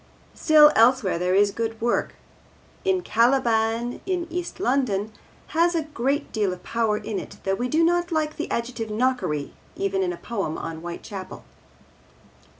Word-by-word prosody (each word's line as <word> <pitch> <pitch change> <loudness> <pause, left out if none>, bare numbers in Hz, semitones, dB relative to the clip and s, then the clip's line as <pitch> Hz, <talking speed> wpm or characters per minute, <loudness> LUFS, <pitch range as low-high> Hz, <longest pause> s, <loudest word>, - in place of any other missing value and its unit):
Still, 305 -1 +6
elsewhere 225 -6 +4
there 180 +1 +1
is 200 +1 +4
good 225 +1 -3
work, 235 +1 0 0.7
and 375 -2 +1
Caliban 230 -1 +1
in 360 -2 -1
East 355 +1 -4
London 240 - 0 0.4
has 340 +2 +2
a 325 - +1
great 285 0 -2
deal 210 -4 0
of 180 0 -8
power 225 -2 0
in 210 -1 -4
it, - - -10
though 195 - 0
we 245 +5 -1
do 320 +4 +3
not 345 +1 +2
like 310 -1 0
the - - -4
adjective 235 -1 -3
'knockery' 215 - -1 0.2
even 195 -1 -1
in 180 -1 0
a 175 - -6
poem 195 -9 -3
on 165 -1 -5
Whitechapel. 175 +3 -8
230 Hz, 155 wpm, -24 LUFS, 200-300 Hz, 0.7 s, Still